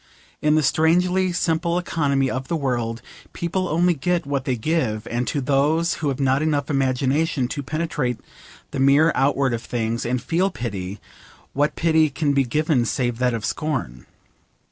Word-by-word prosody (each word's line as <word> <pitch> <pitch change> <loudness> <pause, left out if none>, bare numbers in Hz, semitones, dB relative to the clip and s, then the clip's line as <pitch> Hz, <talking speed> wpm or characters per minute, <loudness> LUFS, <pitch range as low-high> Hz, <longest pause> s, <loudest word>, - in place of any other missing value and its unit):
In 150 0 +3
the 155 - +3
strangely 180 +5 +2
simple 170 0 0
economy 145 -6 0
of 130 0 -3
the 170 - -1
world 120 -6 -2 0.3
people 180 +2 -2
only 175 +2 +2
get 175 +2 -1
what 140 -1 -2
they 130 - 0
give, 115 -4 -1
and 120 +1 -2
to 145 - -1
those 150 +6 +2
who 150 - 0
have 135 -1 -1
not 135 0 +2
enough 150 -2 0
imagination 135 +1 +1
to 145 - -3
penetrate 145 -4 -2 0.5
the - - -4
mere 140 +4 +5
outward 135 -1 +1
of 115 - -2
things, 115 -1 -2
and 125 +2 -1
feel 175 +8 0
pity, 100 - -5 0.5
what 145 +2 +1
pity 160 -2 +3
can 145 +1 0
be 140 -1 +3
given 150 +1 +1
save 120 -1 -1
that 125 -2 +1
of 110 - -4
scorn? 130 - -3
140 Hz, 165 wpm, -22 LUFS, 125-160 Hz, 0.5 s, mere